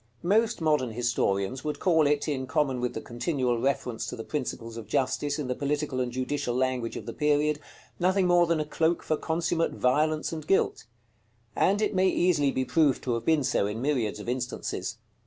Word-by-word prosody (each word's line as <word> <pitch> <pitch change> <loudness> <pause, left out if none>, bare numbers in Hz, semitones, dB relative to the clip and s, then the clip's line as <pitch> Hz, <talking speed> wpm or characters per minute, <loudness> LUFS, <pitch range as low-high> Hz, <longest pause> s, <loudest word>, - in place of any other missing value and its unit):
Most 220 +3 +2
modern 150 -7 +1
historians 120 -1 0
would 150 -1 -2
call 160 -5 +3
it, 145 +1 +1
in 130 -3 -2
common 135 -3 0
with 125 - -2
the - - -3
continual 125 -1 -1
reference 125 -4 -1
to - - -4
the 115 - -6
principles 115 -5 -4
of 115 -3 -8
justice 145 +2 0
in 150 - -3
the 125 - -1
political 145 0 -2
and 125 -1 -2
judicial 130 0 -2
language 130 -2 -1
of - - -7
the - - -5
period, 150 0 +1 0.4
nothing 185 +2 +3
more 175 -1 +4
than 165 -1 +1
a 155 - -1
cloak 160 +2 0
for 155 - 0
consummate 165 +1 -1
violence 155 +5 +1
and 155 -1 -6
guilt; 195 - +1 0.7
and 200 +3 +2
it 210 - 0
may 190 0 +3
easily 175 -6 +2
be 130 -1 -1
proved 145 0 +2
to 125 - 0
have 115 - -3
been 160 -3 +3
so 125 -6 +1
in 105 +2 -4
myriads 125 -6 0
of 105 - -8
instances. 125 0 -3
145 Hz, 195 wpm, -27 LUFS, 125-160 Hz, 0.7 s, more